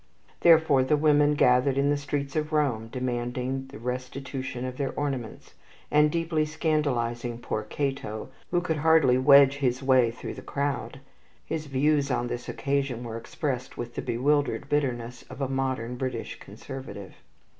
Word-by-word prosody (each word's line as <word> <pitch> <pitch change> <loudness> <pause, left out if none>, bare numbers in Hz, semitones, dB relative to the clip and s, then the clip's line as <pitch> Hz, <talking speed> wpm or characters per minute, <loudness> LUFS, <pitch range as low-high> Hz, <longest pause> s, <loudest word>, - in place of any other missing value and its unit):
Therefore 160 -5 +5
the 150 +3 +2
women 150 -1 +4
gathered 130 0 +3
in 140 +1 +3
the - - +3
streets 140 -1 -3
of 155 0 -1
Rome, 135 -8 +1
demanding 125 +2 -3
the 135 - -10
restitution 130 +1 -5
of 130 0 -5
their 140 -2 -1
ornaments, 135 -6 -4 0.4
and 150 0 +5
deeply 165 -1 0
scandalizing 125 -7 -1
poor 115 -2 -3
Cato, 135 -1 -4 0.2
who 175 0 +1
could 165 -3 -1
hardly 150 -5 +4
wedge 140 0 +7
his 130 -2 0
way 130 -3 +4
through 115 - -7
the - - -9
crowd. 140 -2 -3 0.4
His 155 -1 -4
views 140 +1 +2
on 120 -1 -1
this 120 0 -5
occasion 140 -3 -1
were 115 -2 -6
expressed 125 +2 -4
with 120 0 -5
the - - -3
bewildered 145 +5 0
bitterness 125 -5 -1
of 130 - -10
a 135 - 0
modern 130 -2 -2
British 130 -3 -4
conservative. 105 -2 -9
135 Hz, 155 wpm, -27 LUFS, 125-145 Hz, 0.4 s, wedge